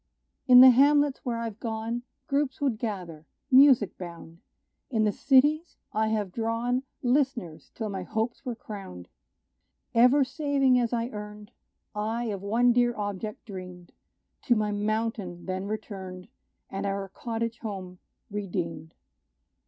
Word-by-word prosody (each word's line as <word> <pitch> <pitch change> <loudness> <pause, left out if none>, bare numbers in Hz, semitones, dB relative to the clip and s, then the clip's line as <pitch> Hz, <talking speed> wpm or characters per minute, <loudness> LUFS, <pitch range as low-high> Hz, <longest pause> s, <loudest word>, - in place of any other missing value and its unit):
In 250 -1 +10
the 260 0 +10
hamlets 285 +2 +4
where 240 -2 -2
I've 225 -2 -5
gone, 225 +1 -3 0.2
Groups 275 -1 -1
would 265 -7 0
gather 180 -9 -5 0.2
music 260 -6 +6
bound: 170 -2 -9 0.5
In 225 -5 +1
the 210 - +3
cities 295 - +3 0.2
I 220 +1 +1
have 210 -3 -1
drawn 230 +4 -1 0.2
List'ners 245 - 0
till 220 -2 -3
my 195 -2 -4
hopes 220 +5 -3
were 245 -2 -4
crowned. 195 - -9 0.8
Ever 250 +4 +5
saving 275 -2 +2
as 235 -2 0
I 235 0 -1
earned, 210 -2 -9 0.4
I 220 +3 -2
of 195 - -6
one 235 +4 +3
dear 240 0 +2
object 205 +1 -5
dreamed; 180 -3 -9 0.5
To 240 - +4
my 210 -1 0
mountain 210 -3 -2
then 185 +1 -3
returned, 190 -4 -6 0.4
And 195 +1 -3
our 195 0 -2
cottage 230 +2 -4
home 185 -4 -7 0.3
redeemed. 170 -6 -4
220 Hz, 135 wpm, -27 LUFS, 195-245 Hz, 0.8 s, In